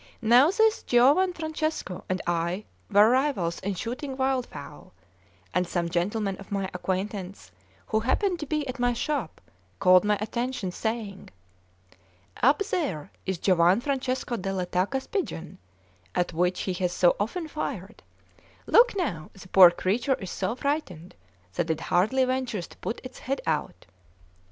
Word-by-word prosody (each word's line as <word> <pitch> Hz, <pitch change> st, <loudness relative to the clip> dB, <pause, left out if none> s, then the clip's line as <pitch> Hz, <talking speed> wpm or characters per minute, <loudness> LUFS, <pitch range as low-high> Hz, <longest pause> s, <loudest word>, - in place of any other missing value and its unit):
Now 245 Hz, +7 st, +6 dB
this 440 Hz, +3 st, +3 dB
Giovan 280 Hz, +10 st, +4 dB
Francesco 315 Hz, -, -4 dB
and 185 Hz, 0 st, -1 dB
I 175 Hz, +3 st, -1 dB, 0.2 s
were 205 Hz, 0 st, +6 dB
rivals 255 Hz, -11 st, +1 dB
in 200 Hz, 0 st, -3 dB
shooting 260 Hz, -, -5 dB
wildfowl; 265 Hz, -1 st, -3 dB, 0.6 s
and 180 Hz, -1 st, +1 dB
some 170 Hz, -1 st, -1 dB
gentlemen 195 Hz, +3 st, -1 dB
of 195 Hz, -, -13 dB
my 195 Hz, -1 st, -2 dB
acquaintance, 185 Hz, -, -4 dB, 0.3 s
who 220 Hz, -, 0 dB
happened 350 Hz, -, 0 dB
to 300 Hz, -, -5 dB
be 305 Hz, 0 st, -1 dB
at 255 Hz, +1 st, -5 dB
my 245 Hz, 0 st, +2 dB
shop, 270 Hz, -, -3 dB, 0.4 s
called 180 Hz, -, +6 dB
my 210 Hz, 0 st, +2 dB
attention, 235 Hz, -1 st, -3 dB
saying: 220 Hz, -1 st, -4 dB, 1.1 s
"Up 280 Hz, +10 st, +4 dB
there 190 Hz, -, -2 dB, 0.2 s
is 190 Hz, -1 st, -1 dB
Giovan 180 Hz, +2 st, +4 dB
Francesco 260 Hz, -2 st, -2 dB
della 190 Hz, -2 st, -2 dB
Tacca's 190 Hz, +10 st, -1 dB
pigeon, 185 Hz, -, -4 dB, 0.6 s
at 175 Hz, -1 st, 0 dB
which 180 Hz, +2 st, 0 dB
he 185 Hz, -, -2 dB
has 180 Hz, 0 st, -1 dB
so 175 Hz, 0 st, +3 dB
often 315 Hz, -, -2 dB
fired; 305 Hz, -, -5 dB, 0.6 s
look 485 Hz, -1 st, +5 dB
now, 175 Hz, -, -2 dB
the 190 Hz, -1 st, -13 dB
poor 185 Hz, -2 st, +9 dB
creature 210 Hz, +10 st, 0 dB
is 190 Hz, -6 st, -7 dB
so 230 Hz, -, -2 dB
frightened 255 Hz, -, -3 dB, 0.4 s
that 165 Hz, +7 st, -1 dB
it 160 Hz, -1 st, 0 dB
hardly 220 Hz, +11 st, +2 dB
ventures 255 Hz, -7 st, -2 dB
to -, -, -16 dB
put 225 Hz, -, -4 dB
its 255 Hz, 0 st, -10 dB
head 275 Hz, +1 st, -2 dB
out." 150 Hz, -, -2 dB
210 Hz, 145 wpm, -26 LUFS, 180-265 Hz, 1.1 s, poor